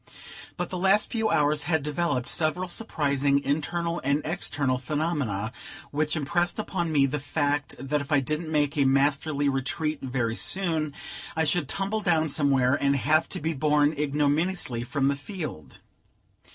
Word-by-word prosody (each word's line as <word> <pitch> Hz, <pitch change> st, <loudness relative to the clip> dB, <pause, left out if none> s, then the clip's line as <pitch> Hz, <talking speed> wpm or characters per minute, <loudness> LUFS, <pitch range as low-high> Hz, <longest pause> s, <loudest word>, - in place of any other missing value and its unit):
But 175 Hz, -1 st, -3 dB
the 180 Hz, -, -3 dB
last 195 Hz, +3 st, +3 dB
few 225 Hz, -2 st, +1 dB
hours 150 Hz, -5 st, +2 dB
had 160 Hz, -4 st, +2 dB
developed 145 Hz, -4 st, -1 dB
several 170 Hz, +3 st, 0 dB
surprising 140 Hz, -8 st, +1 dB
internal 170 Hz, +4 st, -1 dB
and 140 Hz, +2 st, +1 dB
external 145 Hz, -6 st, -1 dB
phenomena, 135 Hz, -, -2 dB, 0.4 s
which 150 Hz, +2 st, 0 dB
impressed 170 Hz, +4 st, 0 dB
upon 180 Hz, -6 st, -2 dB
me 140 Hz, -3 st, +4 dB
the 145 Hz, +2 st, -2 dB
fact 145 Hz, 0 st, -1 dB
that 140 Hz, +3 st, -1 dB
if 145 Hz, +2 st, -8 dB
I 145 Hz, -, +5 dB
didn't 155 Hz, +4 st, -3 dB
make 145 Hz, -1 st, +1 dB
a 140 Hz, -, +4 dB
masterly 140 Hz, +2 st, +2 dB
retreat 145 Hz, +3 st, -1 dB
very 120 Hz, -3 st, -1 dB
soon, 160 Hz, -2 st, +1 dB, 0.4 s
I 160 Hz, -, +2 dB
should 150 Hz, -2 st, 0 dB
tumble 200 Hz, +4 st, -1 dB
down 165 Hz, -5 st, +2 dB
somewhere, 135 Hz, -3 st, +3 dB
and 140 Hz, 0 st, +2 dB
have 155 Hz, +4 st, +2 dB
to -, -, -2 dB
be 160 Hz, +2 st, -1 dB
borne 150 Hz, +1 st, +2 dB
ignominiously 150 Hz, -1 st, 0 dB
from 135 Hz, +3 st, 0 dB
the 140 Hz, -, +2 dB
field. 145 Hz, -, -7 dB
150 Hz, 155 wpm, -26 LUFS, 140-165 Hz, 0.4 s, I